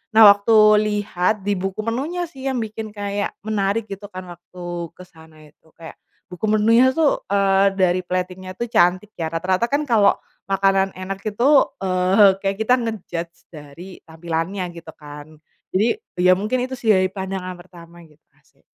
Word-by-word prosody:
nah 225 - +8
waktu 205 +3 +2 0.2
lihat 210 -2 0
di 205 - -1
buku 195 +3 -4
menunya 280 +11 -3
sih 270 0 -7
yang 265 - -1
bikin 215 0 -8
kayak 205 0 -3
menarik 210 0 -1
gitu 200 +1 -7
kan 185 -2 -9
waktu 175 +1 -13 0.3
kesana 160 -3 -16 0.2
itu 155 - -32
kayak, 165 -1 -11 0.4
buku 180 +4 -4
menunya 230 +5 +4
tuh, 320 -3 +2
eee, 195 0 +2
dari 185 -1 +2
plating-nya 185 0 -4
tuh 235 +4 -4
cantik 180 +3 +2
ya 165 - -1
rata-rata 185 +7 -1
kan 285 +4 0
kalo 225 -7 +3 0.3
makanan 195 0 +1
enak 190 +1 -6
itu, 215 +3 -2 0.4
eee, 190 +1 +3
kayak 195 0 -2
kita 220 +4 +1
nge-judge 175 -7 -5
dari 165 +4 -12
tampilannya 165 +3 -4 0.2
gitu 165 -1 -12
kan, 145 0 -11 0.5
jadi 225 - +1 0.2
ya 185 - +6
mungkin 245 +5 -1
itu 260 +1 -5
sih 235 - -7
dari 185 0 +1
pandangan 190 -1 -5
pertama 175 -1 -15
gitu 150 0 -26 0.2
asik. - - -34
195 Hz, 160 wpm, -21 LUFS, 180-215 Hz, 0.5 s, nah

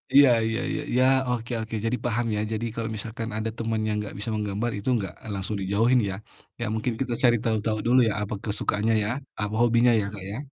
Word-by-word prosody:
Iya 140 -1 +9 0.2
iya 115 +1 -1
iya - - -2
iya, 125 +1 +4 0.3
oke 125 0 -2
oke. 110 0 -5
Jadi, 125 +2 +1
paham 120 0 +1
ya, 105 - 0
jadi, 110 +1 -2
kalau 115 -1 -2
misalkan 115 +2 -5
ada 110 +1 -1
temen 115 -1 -1
yang 105 - 0
nggak 105 - -7
bisa 100 - -3
menggambar, 105 +3 -1
itu 100 +5 -3
nggak 95 -4 -4 0.2
langsung 100 +2 -3
dijauhin 115 +6 +3
ya. 95 - -3 0.5
Ya, - - 0
mungkin 115 +2 -1
kita 125 -2 -1
cari 120 -1 +6
tahu-tahu 110 -1 0
dulu 125 +2 +5
ya, - - -1
apa 105 - -4
kesukaannya 105 +1 0
ya, 105 - -1 0.3
apa 105 +1 -2
hobinya 120 +1 +5
ya, - - -2
Kak, 100 -3 -6
ya? 105 - -4
110 Hz, 215 wpm, -26 LUFS, 105-120 Hz, 0.5 s, Iya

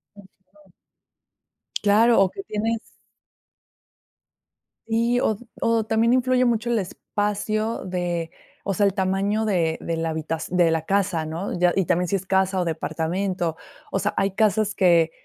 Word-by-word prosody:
Ujú. 195 0 -20 1.1
Claro, 220 +3 +5
o 190 - +4
que 390 - -8
tienes 225 - -1 2.1
Sí, 235 +2 +1
o 220 - +1 0.3
o 230 -1 +2
también 225 +2 +2
influye 255 0 +3
mucho 235 0 0
el 235 - +2
espacio 210 +3 -2
de, 175 -2 -2 0.3
o 195 - -2
sea, 205 - +3
el 195 - +2
tamaño 195 +2 0
de 170 -6 0
de 165 -1 -3
la 165 0 -1
habitaci 160 +2 -3
de 175 -2 +4
la 160 -1 0
casa, 195 -5 0
¿no?, 165 +4 -4
ya, 175 0 +3
y 190 -3 +2
también 180 +1 +1
si 200 - 0
es 190 -1 -4
casa, 190 0 +2
o - - -1
departamento. 170 +2 -2 0.4
O - - 0
sea, - - -1
hay 195 0 +1
casas 215 0 +1
que, 170 -4 +4
195 Hz, 155 wpm, -23 LUFS, 175-215 Hz, 2.1 s, Claro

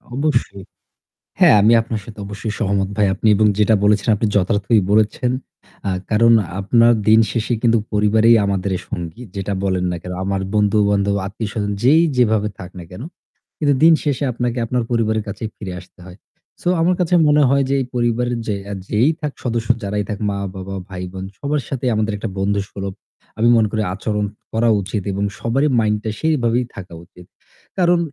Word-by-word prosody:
,অবশ্যই। 135 -9 -1 0.8
হ্যাঁ - - +7
আমি 110 +3 +5
আপনার 110 -2 -4
সাথে 110 -2 -11
অবশ্যই 105 +1 -5
সহমত 100 -2 0
ভাই। 105 -2 +3
আপনি 110 +2 +1 0.3
যেটা 105 +1 +4
বলেছেন 105 +1 +2
আপনি 110 +1 -1
যথার্থই 100 +2 +2
বলেছেন। 110 +3 +2 0.6
আ - - 0 0.2
কারণ 115 +2 +5 0.3
আপনার 115 +4 +4 0.2
দিন 110 +1 +7
শেষে 115 +1 -1
কিন্তু 115 -1 +3 0.2
পরিবারেই 110 +2 +4
আমাদের 100 -1 -1 0.2
সঙ্গী। 85 +6 -6
যেটা 100 0 -3
বলেন 95 -2 0
না 85 - -3
কেন? 90 - -6
আমার 95 -1 -1
বন্ধু 105 0 +2
বান্ধব, 100 0 +1
আত্মীয়স্বজন 105 0 -4
যেই 155 +6 +5
যেভাবে 110 -3 +2
থাক 90 - -8
না - - -8
কেন? 90 - -9 0.6
কিন্তু 145 -2 +2
দিন 165 0 +8
শেষে 145 -1 -1
আপনাকে 120 +1 -2
আপনার 125 +1 -1
পরিবারের 110 -2 0
কাছেই 110 +2 -5
ফিরে 95 -4 -7
আসতে 90 +1 -18
হয়। 90 +1 -12 0.4
সো - - -5
আমার 180 +2 +3
কাছে 180 0 0
মনে 150 0 +4
হয় 140 0 +3
যে - - +1
এই - - -2
পরিবারের 120 0 0
যে 105 - 0 0.3
যেই 120 +8 +2 0.3
সদস্য 115 -2 -2 0.2
যারাই 105 +1 -2
থাক 105 - -4
মা-বাবা, 95 -1 -5
ভাই-বোন 95 +1 -6
সবার 145 0 -1
সাথেই 130 -2 -2
আমাদের 110 0 0
একটা 105 0 -4
বন্ধুসুলভ 100 -1 -2 0.4
আমি 115 +2 +3
মনে 110 -1 +3
করি 110 - -1
আচরণ 105 +1 -2 0.3
করা 115 +1 +2
উচিত 100 +1 -4
এবং 100 +1 -2 0.2
সবারই 135 +6 +1
মাইন্ডটা 105 0 0
সেইভাবেই 125 -6 +1
থাকা 90 -3 -9
উচিত। 90 +1 -17 0.5
কারণ 175 -1 +3
110 Hz, 170 wpm, -19 LUFS, 100-120 Hz, 0.8 s, দিন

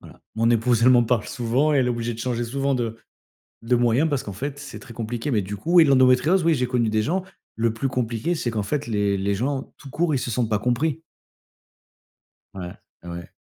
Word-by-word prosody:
voilà - - -15
mon 115 +1 +2
épouse, 115 0 +2
elle 125 - +6
m'en 120 -1 +5
parle 115 -2 0
souvent, 125 +6 +1
elle 135 -4 +3
est - - +1
obligée 120 0 -2
de 115 - -9
changer 120 -1 -2
souvent 135 +3 -1
de 115 -3 -2 0.7
de 120 +2 +2
moyens 120 +5 +2
parce 140 -3 0
qu'en 100 - -7
fait, 140 +8 -5
c'est 140 -2 -8
très 115 - -12
compliqué. 115 +4 -4
Mais 110 - +2
du 100 +2 -5
coup 165 - -3
oui, 170 - +9
l'endométriose 135 +6 +4
oui 165 -1 +4
j'ai 125 -3 0
connu 120 -3 +1
des 110 0 +1
gens. 180 - -1 0.3
Le 115 0 0
plus 135 +4 -2
compliqué, 125 +6 -1
c'est 125 -7 -2
qu'en 110 -2 -1
fait, 145 +7 -2
les 100 -3 0
les 100 +1 0
gens 135 +5 -3
tout 140 - -12
court, 160 +3 0
ils - - 0
se 125 - -4
sentent 115 0 0
pas 105 -2 +1
compris. 140 +7 0 1.5
Ouais. 90 -2 -7 0.3
Ouais, - - -9
ouais. 85 0 -7
120 Hz, 230 wpm, -23 LUFS, 115-140 Hz, 1.5 s, oui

